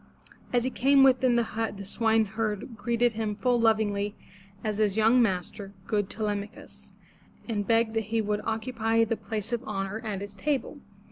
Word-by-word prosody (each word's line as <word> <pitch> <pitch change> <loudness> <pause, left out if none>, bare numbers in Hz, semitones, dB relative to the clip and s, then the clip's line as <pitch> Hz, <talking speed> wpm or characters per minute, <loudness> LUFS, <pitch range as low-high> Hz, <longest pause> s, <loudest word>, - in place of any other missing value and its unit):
As 245 -1 +2
he 260 - -1
came 275 +2 +4
within 255 -2 +4
the 235 - +3
hut 225 -2 -3
the 200 - -7
swineherd 220 +1 0
greeted 235 +1 +1
him 215 -1 -2
full 245 +2 +1
lovingly 210 -2 +1 0.5
as 215 -1 -2
his 210 -1 +1
young 225 +3 +5
master, 195 -1 -2
good 205 -3 -1
Te 220 - -5
lem'a 205 -1 -1
chus, 215 - -15 0.6
and 205 -4 -2
begged 225 -1 +2
that 225 -1 -1
he 225 +2 -1
would 210 -1 -1
occupy 225 0 0
the 225 0 0
place 220 +1 -5
of 235 - -1
honor 195 +1 -3
at 205 -3 -4
his 200 0 -7
table. 280 +6 -2
220 Hz, 180 wpm, -27 LUFS, 205-230 Hz, 0.6 s, young